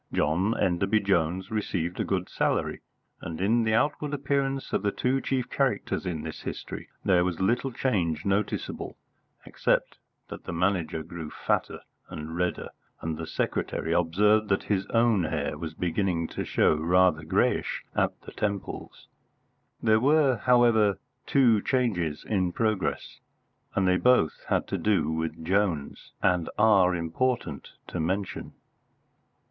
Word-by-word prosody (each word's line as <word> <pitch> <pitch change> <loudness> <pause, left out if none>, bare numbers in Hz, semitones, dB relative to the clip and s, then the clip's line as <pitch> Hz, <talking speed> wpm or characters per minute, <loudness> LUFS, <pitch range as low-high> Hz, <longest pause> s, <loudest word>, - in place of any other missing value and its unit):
John 90 +9 +1
Enderby 95 +4 +2
Jones 95 +1 0
received 90 -5 -2
a - - +2
good 95 -2 -1
salary, - - -1 0.4
and 80 -1 -6
in 115 +5 +2
the 110 0 +2
outward 145 +3 0
appearance 135 -1 -1
of - - +1
the 100 - 0
two 130 +5 0
chief 130 -2 -1
characters - - -1
in 80 -4 -3
this - - -6
history - - -6 0.2
there 90 -2 +4
was 90 -2 -2
little 120 +7 +1
change 90 - -1
noticeable, 100 +1 -2 0.5
except - - 0 0.3
that - - -9
the - - -4
Manager 85 -2 0
grew 80 -1 -7
fatter - - -2 0.3
and 80 +1 -6
redder, 90 +1 -2 0.3
and 80 -1 -3
the - - -6
secretary 80 - -2
observed 105 +6 +3
that 95 - +1
his 95 -2 -1
own 115 -6 +3
hair 75 -1 -2
was 80 +1 -6
beginning 85 -1 -1
to - - -4
show - - +3
rather 85 +1 +3
greyish 80 - 0
at - - 0
the - - -11
temples. 100 -2 -4 0.8
There 110 0 +4
were, 140 0 +3
however, 115 -4 +4 0.3
two 120 -6 +4
changes 95 - -1
in 95 -4 0
progress, 110 -4 -1 0.6
and 95 -1 +2
they 90 0 +4
both 125 -11 +2
had - - +1
to - - -2
do 95 -8 +1
with 80 0 -3
Jones, 90 -6 -1
and 90 -3 +2
are 100 -4 +5
important 85 - -2 0.2
to 90 - -4
mention. 95 +5 -2
95 Hz, 140 wpm, -27 LUFS, 85-110 Hz, 0.8 s, are